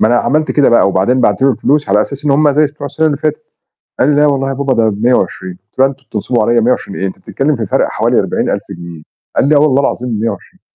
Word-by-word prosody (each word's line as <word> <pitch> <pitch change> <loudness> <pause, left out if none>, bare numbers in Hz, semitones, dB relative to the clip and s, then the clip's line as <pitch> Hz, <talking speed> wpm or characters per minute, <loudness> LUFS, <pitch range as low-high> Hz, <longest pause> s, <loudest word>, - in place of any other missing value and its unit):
ما 110 - +4
أنا 120 - +2
عملت 155 +5 0
كده 145 -2 +3
بقى 115 -4 +4
وبعدين 100 +7 +1
بعت - - +1
له 135 - +4
الفلوس 145 +5 0
على 105 - +3
أساس 140 +4 -6
إن 150 - +1
هم 145 +2 +3
زي 150 +2 +3
بتوع 145 0 -8
السنة 160 +3 -1
اللي 145 - 0
فاتت، 155 0 -2 0.6
قال 130 - +3
لي: 145 - +2
"لأ، 150 +1 +4
والله 135 -2 0
يا 135 - -2
بابا 140 0 -1
ده 115 -2 +2
ب120" 105 -3 -1
قُلت 95 +6 -23
له 135 - +5
"لأ، - - -1
أنتم 135 0 -14
بتنصبوا 110 +2 -1
عليّا 120 +2 +2
120 115 -4 -1
إيه 95 - -1
أنت 95 - -6
بتتكلّم 140 +1 -2
في 110 - -4
فرق - - +1
حوالي - - 0
40000 - - -2 0.2
جنيه" 85 -2 -10 0.3
قال 140 - +2
لي: 150 - +4
"آه، - - +6
والله 145 -2 +3
العظيم 125 -2 -2
ب120" 115 0 -4
130 Hz, 265 wpm, -13 LUFS, 110-145 Hz, 0.6 s, آه